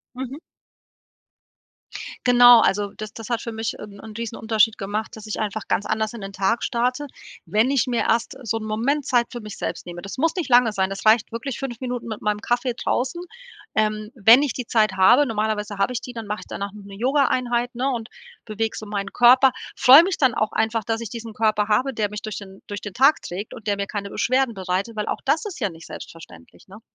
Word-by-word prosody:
Mhm. 265 +3 -6 1.9
Genau, 245 -1 +8
also 205 -1 +1
das 215 -1 -7
das 225 0 -9
hat 235 -1 0
für 230 - -5
mich 220 0 -4
'n 205 -1 -10
'n 220 +1 -10
riesen 230 0 -5
Unterschied 220 0 +2
gemacht, 210 +3 -4
dass 220 0 -10
ich 215 - -4
einfach 215 0 -3
ganz 205 - 0
anders 220 0 -1
in 235 - -8
den 195 0 -8
Tag 200 +4 0
starte, 250 +4 -1 0.4
wenn 220 +5 +2
ich 275 -2 +2
mir 245 -2 0
erst 235 +5 0
so 225 -1 -2
'n 220 - -8
Moment 245 +7 -1
Zeit 245 -3 +2
für 240 - -6
mich 215 -2 -9
selbst - - -5
nehme. 175 0 -8
Das 195 +5 -8
muss 325 +4 +1
nicht 340 -6 -3
lange 240 -2 +5
sein, 190 -1 0
das 195 +2 -6
reicht 220 +1 +4
wirklich: 235 +2 -4
5 245 -4 -5
Minuten 245 -2 -4
mit 215 -2 -5
meinem 210 0 -1
Kaffee 240 +2 -1
draußen. 265 +10 -2 0.5
Ähm, 215 0 0
wenn 230 +3 +6
ich 285 -4 0
die 250 -1 -6
Zeit 215 -4 +2
habe, 190 +10 +6
normalerweise 215 -3 -2
habe 200 +6 +1
ich 235 - -3
die, 250 - -8
dann 230 -2 -7
mache 210 +1 -4
ich - - -12
danach 200 0 -5
noch 210 -1 -11
'ne 200 0 -11
Yogaeinheit, 245 -1 +1
ne, 255 +3 -1
und 235 -2 -4 0.3
beweg 220 0 -3
so - - -6
meinen 200 -1 -4
Körper. 255 +2 +6 0.2
Freu 270 +5 +8
mich 370 0 -2
dann 260 -5 +3
auch 215 - -1
einfach, 220 0 0
dass 225 +1 -2
ich 230 - -5
diesen 230 0 -8
Körper 215 -1 +1
habe, 255 +6 +1
der 210 -2 -1
mich 210 0 -6
durch 215 -1 -6
den 195 -1 -10
durch 205 -1 -6
den 205 - -6
Tag 275 +9 +4
trägt 195 +4 -6
und 225 -4 -12
der 205 -1 +1
mir 200 - -2
keine 200 0 -5
Beschwerden 255 +2 +1
bereitet, 190 +2 -3
weil 210 -1 -3
auch - - -3
das 315 +8 +1
ist 395 - -7
ja 205 -6 -1
nicht 165 -1 -13
selbstverständlich, 160 - -12
ne? 200 +3 -13
225 Hz, 230 wpm, -23 LUFS, 210-245 Hz, 1.9 s, Genau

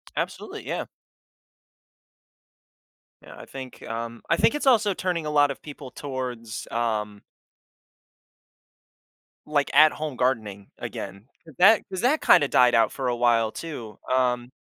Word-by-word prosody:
Absolutely, - - -5
yeah. - - -3 2.4
Yeah, - - -13
I - - -10
think, 130 -2 -10
um 115 0 -6
I 170 - +3
think 230 - +3
it's 295 - -2
also 220 -6 +4
turning 175 -3 -2
a 150 - -2
lot 145 -1 +4
of 135 - -9
people 145 -3 -10
towards, 125 -5 -6
um 105 -3 -2 2.3
like 145 -2 0
at 155 0 +7
home 150 -3 -5
gardening 110 -6 -1
again, 100 +3 -7 0.2
'cause 160 -4 -16
that 200 +4 +6
'cause 185 -1 -4
that 270 +6 +2
kinda 145 - +5
died 125 -2 +4
out 115 -2 +3
for 135 -2 -3
a 120 - 0
while 115 -2 +2
too, 115 -11 -8
um 125 -1 +1
130 Hz, 140 wpm, -25 LUFS, 115-155 Hz, 2.4 s, at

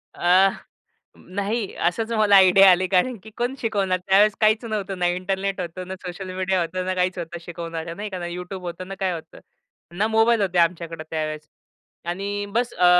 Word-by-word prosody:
अ, 185 +3 +5 0.7
नाही. 200 +3 -3
असंच 220 +7 -1
मला 215 -3 +4
आयडिया 190 0 +8
आली 185 +1 +2
कारण 210 +6 +1
की 220 - -11
कोण 245 +3 -1
शिकवणार? 195 -5 0
त्यावेळेस 200 +1 +5
काहीच 215 +2 +3
नव्हतं. 200 -4 -3
ना 175 - +2
इंटरनेट 190 +2 -2
होतं, 180 +1 -6
ना 190 - -5
सोशल 185 +1 -6
मीडिया 185 0 0
होतं, 185 +2 -3
ना 185 - -1
काहीच 185 0 0
होतं 170 0 -6
शिकवणाऱ्या, 165 -1 -6
नाही 210 +1 -5
का? 185 -2 -5
ना 175 - -5
YouTube 180 +2 -6
होतं, 180 +1 -6
ना 195 - -6
काय 190 -2 0
होतं. 165 -1 -9 0.6
ना 215 +2 +2
मोबाईल 225 0 +3
होते 185 -2 0
आमच्याकडं 165 -1 0
त्यावेळेस. 155 -1 -4 0.6
आणि 200 +3 -3
बस 245 +1 0
अ, 180 - +2
185 Hz, 185 wpm, -23 LUFS, 175-205 Hz, 0.7 s, आयडिया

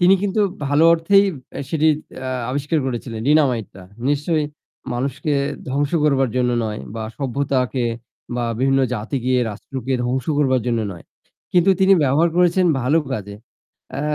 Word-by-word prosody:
তিনি 180 +2 +6
কিন্তু 205 +1 0 0.3
ভালো 145 +3 +3
অর্থেই 195 +5 +4 0.5
সেটি 160 -1 +2 0.4
আ - - -3 0.2
আবিষ্কার 145 +4 -1
করেছিলেন 120 -3 -4
ডিনামাইটটা 125 -11 +1 0.3
নিশ্চয় 150 +2 +1 0.5
মানুষকে 135 +5 -2 0.4
ধ্বংস 145 +1 0
করবার 135 -3 +3
জন্য 125 -1 +2
নয় 105 -1 -4
বা 115 - -4
সভ্যতাকে 130 -2 -1 0.5
বা 120 - -1
বিভিন্ন 135 +1 +2
জাতিকে 125 +3 -2 0.2
রাষ্ট্রকে 130 +5 -5
ধ্বংস 125 +1 -1
করবার 130 -3 +2
জন্য 115 -2 +1
নয়। 85 - -12 0.5
কিন্তু 180 +1 +4
তিনি 190 +1 +6
ব্যবহার 145 +5 +3
করেছেন 180 +1 +3
ভালো 145 +7 +2
কাজে। 100 -4 -5 0.6
আ - - -2
135 Hz, 135 wpm, -20 LUFS, 125-155 Hz, 0.6 s, তিনি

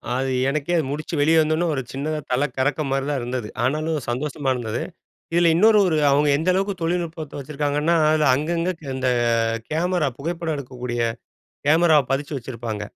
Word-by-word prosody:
அது 130 +1 -1 0.2
எனக்கே 155 +4 -1
அது 160 - +1
முடிச்சு 155 +3 -4
வெளியே 160 +3 +4
வந்தோனே 155 +2 +1
ஒரு 135 - -1
சின்னதா 150 +3 -3
தல 130 +3 +2
கறக்கம் 145 +2 0
மாரி 135 0 0
தான் 145 -2 0
இருந்தது. 120 -2 -3 0.2
ஆனாலும் 155 +4 0
சந்தோஷமா 140 +2 -2
இருந்தது. 115 -1 -3 0.5
இதில 170 -1 +4
இன்னொரு 215 +4 +5
ஒரு 160 - +1
அவங்க 145 +1 +3
எந்த 165 +4 0
அளவுக்கு 195 +2 0
தொழில்நுட்பத்த 165 -3 -3
வச்சிருக்காங்கன்னா, 150 +3 0
அதில 155 -1 +3
அங்கங்க 165 +5 -1 0.2
இந்த 130 -1 0 0.6
கேமரா 165 -1 0
புகைப்படம் 165 +1 -3
எடுக்கக்கூடிய 125 -3 -4 0.7
கேமராவ 160 -1 +5
பதிச்சு 145 +2 -2
வச்சிருப்பாங்க. 115 -4 -5
150 Hz, 155 wpm, -22 LUFS, 135-165 Hz, 0.7 s, இன்னொரு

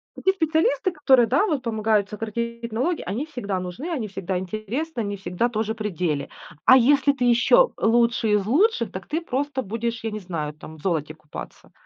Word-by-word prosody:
такие 380 - +1
специалисты, 320 -1 +1
которые, 265 -7 +4
да, 280 - +3
вот 295 -9 -1
помогают 215 -3 +1
сократить 235 +2 -4
налоги, 290 +10 0
они 250 +9 -3
всегда 205 -11 -4
нужны, 180 - -6
они 255 -10 -2
всегда 190 -1 -3
интересны, 220 - -4
они 205 -1 -3
всегда 195 +5 -1
тоже 220 -1 -1
при 215 -2 -3
деле. 160 -6 -2 0.4
А 260 - +8
если 280 +3 +4
ты 250 -3 -1
еще 245 - +5
лучший 230 -1 +2
из 200 -2 +2
лучших, 415 - +2
так - - -7
ты 320 +3 -2
просто 275 -2 -2
будешь, 230 +2 -3
я 225 - -2
не 215 - -4
знаю 160 -5 -4
там, 155 +1 -12
в - - -16
золоте 155 -5 -1
купаться. 150 -1 -10
230 Hz, 185 wpm, -24 LUFS, 200-275 Hz, 0.4 s, А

